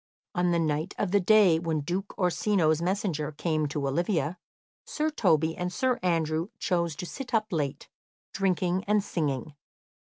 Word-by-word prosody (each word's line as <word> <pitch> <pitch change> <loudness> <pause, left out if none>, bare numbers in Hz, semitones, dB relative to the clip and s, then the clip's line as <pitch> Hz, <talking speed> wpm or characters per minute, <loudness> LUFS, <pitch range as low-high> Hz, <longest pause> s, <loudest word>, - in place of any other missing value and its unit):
On 175 0 +1
the 170 - +2
night 160 +2 -1
of 190 - -1
the 205 - +4
day 195 -4 +5
when 165 -2 -1
Duke 180 +7 -4
Orsino's 180 -3 +2
messenger 175 -5 -1
came 155 0 -1
to 140 -1 -2
Olivia, 165 +2 0 0.4
Sir 310 +1 -2
Toby 160 - +2
and 180 0 -3
Sir 255 +4 0
Andrew 165 -2 0
chose 170 -4 0
to 180 - -5
sit 255 +5 -5
up 215 -1 +2
late, 145 -5 -2 0.5
drinking 185 -1 0
and 210 0 +2
singing. 150 -5 -2
175 Hz, 155 wpm, -28 LUFS, 155-195 Hz, 0.5 s, day